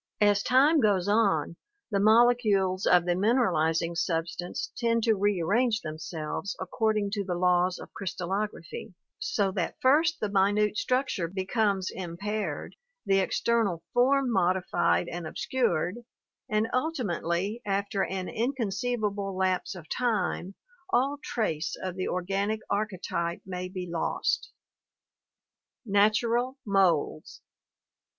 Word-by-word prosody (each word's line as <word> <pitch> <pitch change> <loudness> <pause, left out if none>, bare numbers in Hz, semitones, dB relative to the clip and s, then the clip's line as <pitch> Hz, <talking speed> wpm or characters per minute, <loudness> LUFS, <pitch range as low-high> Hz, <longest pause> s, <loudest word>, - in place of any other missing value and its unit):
As 205 -1 +4
time 280 +7 +4
goes 200 -6 +2
on, 170 -7 +2 0.3
the 200 - +1
molecules 215 -4 +4
of 175 -1 +5
the 175 - +2
mineralizing 170 -6 +1
substance 170 +1 -2
tend 230 -1 +1
to 225 - +4
rearrange 205 +4 +1
themselves 155 +4 -5
according 215 -2 0
to 205 -1 -1
the 180 -2 -3
laws 180 0 +2
of - - -11
crystallography, 190 -1 -4 0.2
so 200 -2 0
that - - -3
first 315 +5 +3
the 210 - -1
minute 205 +1 +2
structure 250 -7 0
becomes 195 +1 0
impaired, 195 +4 -4 0.3
the 195 0 +3
external 195 -3 0
form 260 +1 +3
modified 180 - +1
and 175 -1 -5
obscured, 230 -4 -1 0.5
and 215 +1 +1
ultimately 220 - -1
after 200 0 -1
an 185 -1 -3
inconceivable 215 -5 -2
lapse 185 0 0
of 165 -4 -10
time 200 -5 -1 0.3
all 280 -2 +1
trace 165 -8 -2
of 185 -1 -4
the 185 - -2
organic 195 +4 -1
archetype 185 -4 -2
may 180 -1 -5
be 185 -1 -5
lost. 170 -1 -1 1.3
Natural 230 +5 +2
Moulds. 185 -7 +1
200 Hz, 115 wpm, -28 LUFS, 180-225 Hz, 1.3 s, of